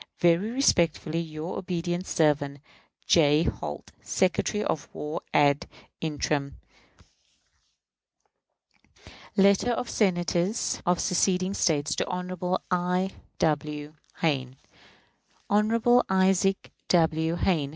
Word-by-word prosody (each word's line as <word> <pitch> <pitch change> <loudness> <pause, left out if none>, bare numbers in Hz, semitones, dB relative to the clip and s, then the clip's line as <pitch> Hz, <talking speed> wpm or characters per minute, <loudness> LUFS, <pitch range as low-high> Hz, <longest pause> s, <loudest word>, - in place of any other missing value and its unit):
Very 175 +5 +3
respectfully, 170 - +1
your 160 +1 -5
obedient 175 0 -3
servant, 145 -3 +1 0.4
J. 150 -1 +4
HOLT, 75 - -5
Secretary 195 +2 0
of 150 - -3
War 150 +2 -4
ad 145 -1 +3 0.3
interim. 150 -2 -2 2.8
Letter 200 +4 +4
of 245 +1 -2
Senators 180 +1 0
of 180 0 +2
seceding 185 0 +1
States 155 -5 +1
to - - -1
Hon. 180 0 -2
I. 180 +1 0 0.3
W. 150 -1 -1 0.3
Hayne. 130 -5 0 1.0
Hon. 230 +4 +4
Isaac 190 0 +2 0.2
W. 160 -1 +2
Hayne. 165 -6 0
175 Hz, 90 wpm, -27 LUFS, 155-190 Hz, 2.8 s, J